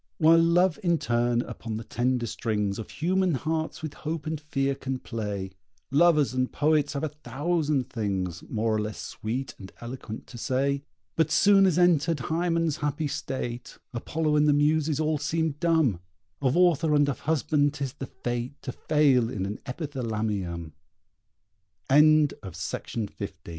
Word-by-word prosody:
While 165 0 +6
Love 175 +2 +3
in 170 -3 +2
turn 120 -2 +1
upon 110 -2 -6
the 115 - -6
tender 120 +2 0
strings 105 -3 -2
Of 110 - -7
human 185 0 +1
hearts 160 +4 -3
with 155 -2 -4
hope 155 -1 -5
and 155 -1 -3
fear 140 -2 0
can 135 -1 -4
play, 105 -6 -4 0.4
Lovers 150 -2 +4
and 130 0 0
poets 150 -1 +2
have 140 - -3
a 155 - 0
thousand 150 -1 -1
things, 95 -6 -2
More 110 0 0
or 110 - +1
less 105 0 -5
sweet 125 +5 -4
and 95 - -10
eloquent, 120 -2 -7
to 120 - -10
say. 140 +3 0 0.3
But 160 - +2
soon 195 -1 +5
as 175 -3 +1
entered 170 -3 +3
Hymen's 165 +2 0
happy 145 +1 -1
state 130 -4 -5 0.2
Apollo 150 +5 0
and 150 0 +4
the 145 - +5
Muses 150 +1 +2
all 155 -1 +1
seem 160 +2 0
dumb. 160 - +2 0.4
Of 135 +2 +2
author 165 -4 +4
and 145 -1 +4
of 140 - -2
husband 145 -1 +1
'tis 135 -3 -3
the 135 - -7
fate 120 +3 -4
To 130 - -4
fail 135 -4 +2
in 100 -6 -3
an 100 +2 -5
Epithalamium! 110 - -3 1.2
FOOTNOTES: 150 - +3 0.5
A - - -2
140 Hz, 155 wpm, -27 LUFS, 120-155 Hz, 1.2 s, While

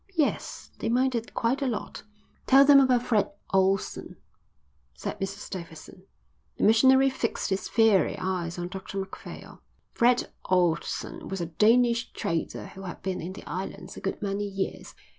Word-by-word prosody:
Yes, 300 -3 -1
they 225 - -2
minded 245 -1 0
quite 245 +5 0
a 275 - +1
lot." 230 -4 -4 0.5
"Tell 275 +1 +7
him 280 -1 +8
about 255 -3 +3
Fred 215 -5 +1 0.2
Ohlson," 195 0 +1 0.8
said - - -5
Mrs 195 +1 -5
Davidson. 180 +1 -9 0.5
The - - -2
missionary 265 +5 +5
fixed 230 -5 -2
his 190 - -1
fiery 220 -7 +3
eyes 180 -2 -3
on 175 0 -4
Dr 190 +1 -7
Macphail. 195 0 -8 0.3
"Fred 245 +1 +2
Ohlson 175 -3 0
was 195 - -3
a 170 - -1
Danish 230 +7 +3
trader 165 -1 -3
who 195 - -11
had 185 -2 -8
been 190 -1 -2
in 180 +3 -6
the - - -11
islands 190 0 -6
a - - -9
good 195 - -3
many 200 +1 -2
years. 195 -1 -5
195 Hz, 155 wpm, -27 LUFS, 185-240 Hz, 0.8 s, him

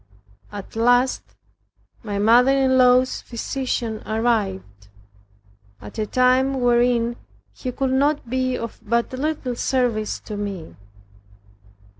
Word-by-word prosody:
At 205 0 -9
last 245 +3 +3 0.8
my 205 -3 -4
mother 235 +5 +5
in 265 -1 +2
law's 255 0 +4
physician 235 -2 -3
arrived, 200 - -2 0.9
at 105 - -10
a 215 - -1
time 255 +3 +2
wherein 240 -1 +2 0.4
he 255 - -5
could 270 +2 0
be 255 +1 -1
of 230 0 -7
but 235 +3 -1
little 265 -2 -2
service 235 -4 -1
to 210 - -7
me. 195 - -6
245 Hz, 105 wpm, -22 LUFS, 215-255 Hz, 0.9 s, mother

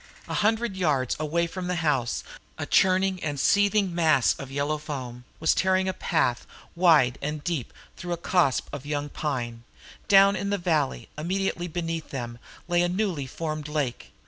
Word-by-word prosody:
A - - -4
hundred 220 0 +1
yards 145 -9 +1
away 160 +3 0
from 180 +1 -5
the 180 - -1
house 130 -6 0 0.3
a - - -3
churning 190 0 +3
and 145 -2 -2
seething 205 +2 +3
mass 155 -7 +3
of 135 - -7
yellow 145 +2 -1
foam 125 -5 -6
was 160 - +3
tearing 190 0 +2
a 190 - 0
path, 125 -11 0 0.3
wide 160 -8 +4
and 150 +1 -3
deep, 160 -9 -2 0.3
through 175 -1 -4
a - - -3
copse 170 -5 +2
of 145 -2 -5
young 145 0 -3
pine; 120 -7 -3 0.5
down 200 -1 +6
in 200 - -2
the 200 - +1
valley 160 -7 0
immediately 180 +1 -1
beneath 165 -1 -4
them 120 -3 -5 0.3
lay 175 0 +2
a 175 - +2
newly 180 -7 -1
formed 155 +1 -4
lake. 150 -5 -3
160 Hz, 170 wpm, -26 LUFS, 140-185 Hz, 0.5 s, down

